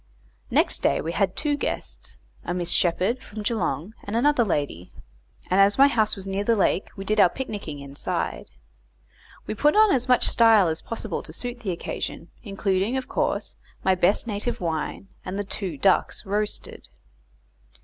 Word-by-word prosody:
Next - - +2
day - - +2
we 165 - -3
had 190 0 0
two 295 -1 0
guests, 285 - -5 0.3
a 175 - -3
Miss 175 -1 -1
Sheppard, 185 +8 +2
from 210 0 -8
Geelong, 205 -3 -2
and 205 - -5
another 255 +1 +3
lady, 145 - -2 0.6
and 185 - +2
as 200 +1 +5
my 275 +1 +7
house 220 -6 +1
was 195 -2 -7
near 195 +1 -2
the 230 +2 +2
lake, 195 -1 +1
we 195 -1 -7
did 215 +1 +1
our 190 -3 +7
picnicking 205 - -6
inside. 140 0 -4 1.0
We - - -3
put 295 - +2
on 430 -1 +6
as 250 -1 0
much 250 - +6
style 225 -5 +5
as 160 - -3
possible 225 -5 -4
to - - -8
suit 245 +8 -5
the 220 - -5
occasion, 175 - -5
including, 195 +2 -1
of 260 - -4
course, - - -2 0.3
my 190 - +4
best 185 +4 +2
native 225 +2 -3
wine, 165 +3 -3
and 185 +2 -5
the 205 - -1
two 190 -5 -4
ducks 190 +7 +1
roasted. 205 +1 -3
200 Hz, 170 wpm, -24 LUFS, 180-230 Hz, 1.0 s, my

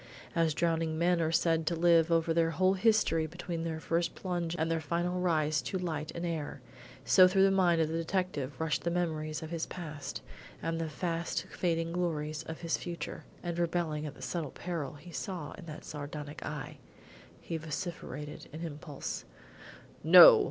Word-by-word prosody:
As 165 -3 +2
drowning 165 -2 +1
men 175 +1 +3
are 160 0 +1
said 165 -1 +2
to 170 - +2
live 165 0 +4
over 165 0 +3
their 165 0 +3
whole 185 +4 +3
history 195 -6 +3
between 170 0 -5
their 160 -1 -3
first 170 +1 0
plunge 175 -2 -2
and 160 +1 0
their 165 -1 0
final 175 +3 -1
rise 155 -4 +2
to 190 - -3
light 155 -4 -3
and 170 - -3
air, 160 -4 -3 0.5
so 185 -1 +8
through 190 +1 +4
the 195 - +5
mind 180 -3 +4
of 160 - +3
the 165 +1 -2
detective 160 -6 -2
rushed 160 -1 0
the 170 - +1
memories 160 -2 -2
of 160 - -7
his 165 -1 -2
past 155 -5 -6 0.4
and 165 0 -2
the 160 - -2
fast 170 +1 -2
fading 165 -2 0
glories 155 -3 -1
of 160 0 -7
his 165 -1 0
future; 175 -1 -6 0.2
and 175 -1 -3
rebelling 165 -3 0
at 145 - -8
the - - -11
subtle 165 -5 -2
peril 165 -3 -4
he 160 +4 -12
saw 155 +2 -4
in 175 - -10
that 155 - -8
sardonic 145 0 -6
eye, 150 0 -6 0.6
he 165 - -5
vociferated 150 -2 -6
an 155 +2 -7
impulsive: 150 -2 -6 0.8
"No! 175 +3 +10
165 Hz, 180 wpm, -31 LUFS, 155-175 Hz, 0.8 s, No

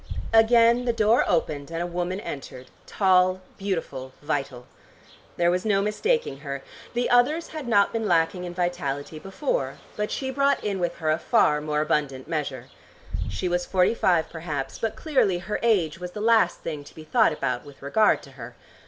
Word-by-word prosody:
Again 230 +2 +5
the 240 - +1
door 225 +1 +3
opened, 155 -5 -1
and 165 0 -4
a 175 - -1
woman 175 +2 -3
entered, 130 - -8 0.2
tall, 185 -1 +3 0.2
beautiful, 160 -9 -4
vital. 135 -4 -3 0.7
There 175 0 +3
was 180 +1 0
no 205 -3 +2
mistaking 210 - 0
her. 140 -2 -6 0.3
The 245 0 +1
others 285 +7 +3
had 310 -5 -6
not 205 -4 +3
been 225 -1 -1
lacking 175 +1 +2
in 175 -1 -6
vitality 155 -4 -2
before, 190 - -2 0.2
but 210 0 -2
she 265 -1 -3
brought 280 +1 +1
in 200 -2 -2
with 175 -1 -1
her 155 -1 0
a 155 - +1
far 150 0 +3
more 150 0 -1
abundant 145 -4 -1
measure. 140 -6 -4 0.6
She 185 - -2
was 175 0 -1
forty 185 +2 +3
five, 175 -7 +2
perhaps, 155 -5 -5
but 225 - -2
clearly 260 - +1
her 180 +4 -4
age 185 -9 +2
was 180 0 -7
the - - -6
last 220 -4 +3
thing 150 -3 -5
to - - -15
be 155 - -10
thought 220 +6 +3
about 135 -5 -2
with 145 -2 -15
regard 210 +10 +3
to - - -13
her. - - -10
180 Hz, 180 wpm, -25 LUFS, 150-220 Hz, 0.7 s, Again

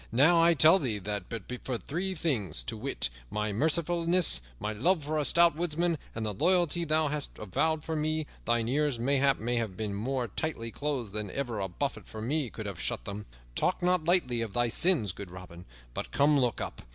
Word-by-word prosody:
"Now 155 +8 +5
I 170 0 +5
tell 160 +5 +7
thee 120 - -1
that 100 -1 -4
but 115 -4 -5 0.2
for 125 -2 -2
three 185 +9 -3
things, 105 - -1
to - - -4
wit, - - -1 0.2
my 105 -1 -2
mercifulness, 170 - +2 0.2
my 105 - -2
love 160 - +1
for 155 +2 -1
a 150 - 0
stout 170 0 +5
woodsman, 170 0 0 0.2
and 110 -1 -3
the 105 - -1
loyalty 175 - +2
thou 155 -1 +2
hast 150 -1 -4
avowed 155 - 0
for 160 - -3
me, 155 0 -1 0.2
thine 120 -1 +1
ears, 145 0 +1
mayhap, 135 +3 +2
might 120 +2 -1
have 105 -5 -4
been 105 -2 -3
more 125 +4 -2
tightly 115 -5 -4
closed 135 -8 -3
than 105 -1 -2
ever 120 -2 -3
a 95 - -1
buffet 135 +9 -4
from 110 +1 -6
me 145 -2 0
could 110 - -7
have 100 -4 -5
shut - - -2
them. 105 +1 -6 0.3
Talk 185 - 0
not 180 -2 +2
lightly 160 -9 +2
of 110 -4 -4
thy 120 +1 +1
sins, 130 - +4
good 100 +1 -8
Robin. 90 -1 -11 0.3
But - - -5
come, 145 +2 +4
look 125 -5 +1
up. - - -5
135 Hz, 205 wpm, -29 LUFS, 110-160 Hz, 0.3 s, tell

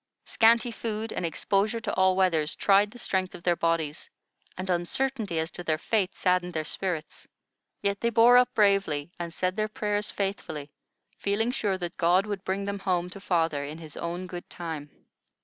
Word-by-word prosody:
Scanty 235 +1 +4
food 225 -1 -4
and - - -3
exposure 200 +6 0
to 225 -2 -3
all 190 0 +4
weathers 165 -5 +2
tried 200 +1 +4
the 240 - -13
strength 190 -5 -1
of 170 - -11
their 175 0 +3
bodies, 165 -2 -1 0.5
and 185 +1 -4
uncertainty 195 +3 -1
as 160 +1 -1
to 175 - -6
their 155 -2 +1
fate 195 +2 0
saddened 180 -2 +1
their 155 - 0
spirits; 170 -2 -4 0.6
yet 200 0 0
they 235 - +2
bore 235 +2 +6
up 250 0 +4
bravely, 195 -7 +2
and 170 -1 -4
said 185 +2 -1
their 215 0 0
prayers 210 -1 -2
faithfully, 160 -7 -4 0.5
feeling 215 +4 0
sure 205 -6 0
that 175 -1 -5
God 180 +3 +3
would 205 -2 -4
bring 195 +1 -2
them 200 0 -3
home 180 -2 -1
to 195 - -8
father 165 -6 0
in 150 +2 -6
His 160 -3 -9
own 175 +2 -4
good 175 -1 -8
time. 160 -4 -6
185 Hz, 185 wpm, -27 LUFS, 170-205 Hz, 0.6 s, bore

